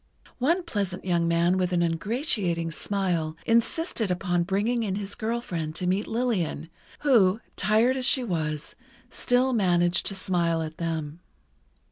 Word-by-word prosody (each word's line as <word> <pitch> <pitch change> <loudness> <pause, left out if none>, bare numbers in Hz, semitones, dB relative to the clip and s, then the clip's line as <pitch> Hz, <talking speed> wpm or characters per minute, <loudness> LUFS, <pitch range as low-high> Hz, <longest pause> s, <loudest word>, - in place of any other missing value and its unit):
One 335 +8 +2
pleasant 200 - -3
young 170 -2 +1
man 170 +2 +2
with 180 -1 0
an 175 -1 +2
ingratiating 170 - -1
smile, 170 -4 -1
insisted 230 - +1
upon 180 -1 0
bringing 205 +7 0
in 200 -4 -1
his 200 0 -5
girl 230 +2 -2
friend 160 -8 -4
to 180 - -3
meet 190 +4 0
Lillian, 200 -9 -1 0.3
who, 225 -8 +4 0.2
tired 220 +6 +3
as 260 -1 0
she 260 - +3
was, 155 -7 -3 0.4
still 255 +1 +1
managed 175 -5 +2
to 195 - -2
smile 170 -3 0
at 155 0 -7
them. 160 -2 -3
185 Hz, 145 wpm, -26 LUFS, 170-230 Hz, 0.4 s, who